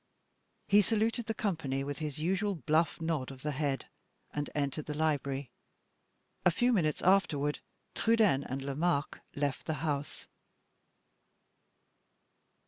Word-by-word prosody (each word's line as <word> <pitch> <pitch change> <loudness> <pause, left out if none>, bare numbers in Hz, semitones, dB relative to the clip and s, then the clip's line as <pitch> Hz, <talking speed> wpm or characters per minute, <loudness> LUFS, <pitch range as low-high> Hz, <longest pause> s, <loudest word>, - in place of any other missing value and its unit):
He 205 +1 +6
saluted 225 +2 0
the 225 - -1
company, 155 -11 -1
with 145 0 -4
his 150 -3 -4
usual 190 +5 0
bluff 160 +4 +1
nod 160 -5 -1
of 135 -1 -10
the 150 - 0
head, 140 -1 -1 0.5
and 145 0 -2
entered 145 +1 -1
the 150 - -3
library. 140 -4 0 0.9
A - - +6
few 245 +8 +2
minutes 155 -8 +1
afterward, 160 -6 +3 0.3
Trudaine 220 -12 +3
and 135 +1 -4
Lomaque 140 +2 0 0.2
left 140 -1 -2
the 160 - 0
house. 145 -2 -3
155 Hz, 125 wpm, -32 LUFS, 140-185 Hz, 0.9 s, He